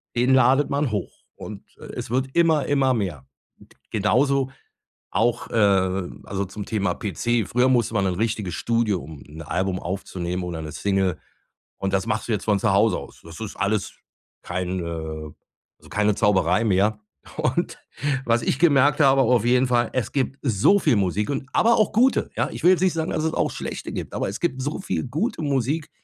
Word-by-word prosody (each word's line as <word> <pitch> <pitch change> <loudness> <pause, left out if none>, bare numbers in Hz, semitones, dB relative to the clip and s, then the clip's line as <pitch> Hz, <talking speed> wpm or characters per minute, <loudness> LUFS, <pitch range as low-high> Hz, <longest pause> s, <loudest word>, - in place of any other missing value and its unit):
den 125 +2 +3
ladet 130 +2 +4
man 140 0 +1
hoch 105 -4 -5
und, - - -9 0.2
äh, - - -10
es - - -5
wird 130 +2 0
immer, 160 -4 +3
immer 135 -2 +2
mehr. 85 - -3 0.6
Genauso 130 +6 +2 0.6
auch, 115 +1 +1
äh - - -8 0.7
also 100 0 -3
zum 100 +2 -7
Thema 100 -5 0
PC. 115 +2 -1
Früher 125 +2 +2
musste 120 -4 +2
man 100 -2 +2
in 90 - 0
'n - - -7
richtiges 110 -5 -1
Studio, 115 -5 0
um 75 -1 -10
'n 80 +2 -10
Album 90 +4 -1
aufzunehmen 90 -1 -4
oder 85 -2 -5
'ne 75 - -7
Single, 95 -3 0 0.6
und 95 0 -3
das 95 0 +1
machst 110 -1 -1
du 120 - 0
jetzt 105 - -2
von 105 -2 +2
zu 110 - +2
Hause 100 0 +3
aus. - - -11
Das 85 0 -11
ist 110 -3 -6
alles 100 0 -1 0.5
kein, 90 +1 -3
äh 80 -2 -5 0.5
also - - -17
keine 105 +1 +2
Zauberei 95 -2 +2
mehr. 105 +2 +2 0.4
Und - - -1 0.5
was 120 0 +2
ich 135 - 0
gemerkt 145 -3 +4
habe 135 -1 +5
auf 120 -2 +3
jeden 125 +2 +3
Fall, 120 -2 +1
es 130 - -1
gibt 135 0 -1
so 125 - +3
viel 145 - +2
Musik 100 +2 0
und 135 -1 -3
aber 235 +1 +4
auch 215 - +2
gute, 250 +4 +3
ja? - - 0
Ich - - -8
will 180 - +8
jetzt 185 -2 +2
nicht 185 -2 +3
sagen, 160 0 -2
dass 155 - -1
es 160 - 0
auch - - +1
schlechte - - -6
gibt, - - -5
aber - - -1
es 100 - -6
gibt 135 -7 -1
so 145 +4 -3
viel - - -2
gute 165 - -2
Musik, 145 +2 -1
110 Hz, 195 wpm, -23 LUFS, 95-135 Hz, 0.7 s, will